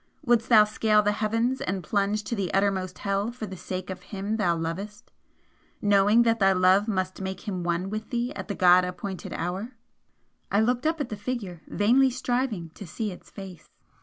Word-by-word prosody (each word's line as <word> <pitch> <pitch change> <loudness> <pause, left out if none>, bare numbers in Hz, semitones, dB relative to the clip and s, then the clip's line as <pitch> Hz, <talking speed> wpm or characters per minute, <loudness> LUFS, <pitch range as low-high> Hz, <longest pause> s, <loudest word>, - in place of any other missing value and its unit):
Wouldst 240 -1 +2
thou 220 -3 +8
scale 215 0 +2
the 205 - +2
heavens 225 +5 0
and 185 -1 -2
plunge 205 +1 0
to - - -4
the 195 -5 -2
uttermost 190 -2 0
hell 200 +3 -1
for 240 -2 -6
the 190 - -8
sake 185 +1 -5
of 185 -1 -7
him 200 +3 -4
thou 175 -6 +2
lovest, 195 +6 -5 0.7
knowing 205 +2 +4
that 230 -1 +2
thy 195 -1 +5
love 185 +3 +4
must 185 -3 -2
make 190 +1 -5
him 185 -3 -3
one 175 +2 -1
with 215 0 -5
thee 240 +1 -2
at - - -7
the 200 - -3
God 180 0 +6
appointed 180 +1 -5
hour?" 195 +9 -4 0.8
I 200 - +3
looked 245 +6 +1
up 320 -1 0
at 275 - -3
the 215 - -4
Figure, 205 -6 -5
vainly 250 +6 +3
striving 245 -8 -2
to 200 - -10
see 210 +6 -3
its 180 - -12
face. 185 -5 -10
205 Hz, 195 wpm, -26 LUFS, 185-225 Hz, 0.8 s, thou